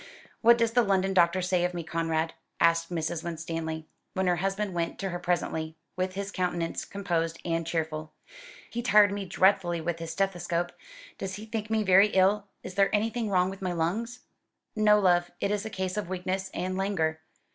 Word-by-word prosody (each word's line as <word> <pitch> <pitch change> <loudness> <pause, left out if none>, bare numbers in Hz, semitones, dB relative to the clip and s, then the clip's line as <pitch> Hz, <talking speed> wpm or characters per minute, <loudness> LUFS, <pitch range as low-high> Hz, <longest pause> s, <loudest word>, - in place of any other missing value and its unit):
"What 235 +1 +7
does 230 -1 +2
the 245 +1 +4
London 195 -3 +1
doctor 180 0 +3
say 180 -1 +1
of 180 0 -1
me, 170 - -3
Conrad?" 165 0 -1 0.3
asked 165 0 +3
Mrs. 165 -1 -2
Winstanley, 165 -1 -4 0.3
when 190 0 +1
her 180 -1 +2
husband 195 +2 -1
went 170 -1 -2
to 195 - -3
her 175 -1 -4
presently, 160 -3 -1 0.2
with 185 0 -2
his 200 0 -4
countenance 175 -3 -2
composed 170 -5 -2
and 165 -1 -1
cheerful. 155 -2 -2 0.6
"He 235 - -2
tired 210 -3 +6
me 200 -1 -3
dreadfully 185 -2 +2
with 165 +1 -3
his 165 -1 -5
stethoscope. 175 -2 -1 0.5
Does 190 -1 -4
he 210 +2 -8
think 220 0 -4
me 220 -1 +1
very 195 +1 +6
ill? 200 +1 +3 0.2
Is - - -7
there 195 +1 +3
anything 220 +1 0
wrong 185 -1 +2
with 195 - -10
my 185 -2 -1
lungs?" 220 +9 -2 0.5
"No, 210 -1 +5
love. 175 -3 +3
It 200 - 0
is 210 +1 -1
a - - -5
case 190 -1 -3
of 205 -4 -3
weakness 185 +1 -2
and 185 +1 -3
languor. 170 -5 0
185 Hz, 190 wpm, -28 LUFS, 170-200 Hz, 0.6 s, What